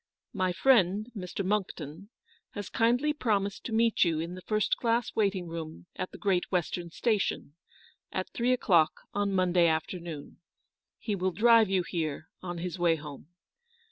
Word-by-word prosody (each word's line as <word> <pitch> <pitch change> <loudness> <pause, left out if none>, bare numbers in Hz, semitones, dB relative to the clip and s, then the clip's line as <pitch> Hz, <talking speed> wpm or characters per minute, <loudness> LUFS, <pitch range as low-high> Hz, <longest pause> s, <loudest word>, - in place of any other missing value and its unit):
"My 185 -3 +1
friend, 210 0 +3
Mr. 185 0 -4
Monckton, 185 -3 -3 0.5
has 205 -2 -5
kindly 245 +6 +2
pro 230 -8 +1
mised 200 0 -5
to - - -4
meet 225 0 +3
you 165 -3 +1
in 170 +2 -4
the 185 - -8
first 215 +2 0
class 235 0 0
waiting 195 -4 +1
room 165 -1 -7
at 185 - -4
the - - -11
Great 190 -3 0
Western 175 -1 -1
Station, 205 -6 -1 0.6
at 185 - -2
three 245 +1 +1
o* - - +2
clock 170 -9 +3
on 205 0 0
Monday 180 -2 +3
afternoon. 160 -1 -3 0.6
He 215 - -3
will 185 -1 0
drive 225 +1 +5
you 190 -2 +2
here 160 -3 -3
on 175 -1 -5
his 175 +1 -4
way 170 -2 +4
home. 150 -2 -9
185 Hz, 165 wpm, -29 LUFS, 170-215 Hz, 0.6 s, drive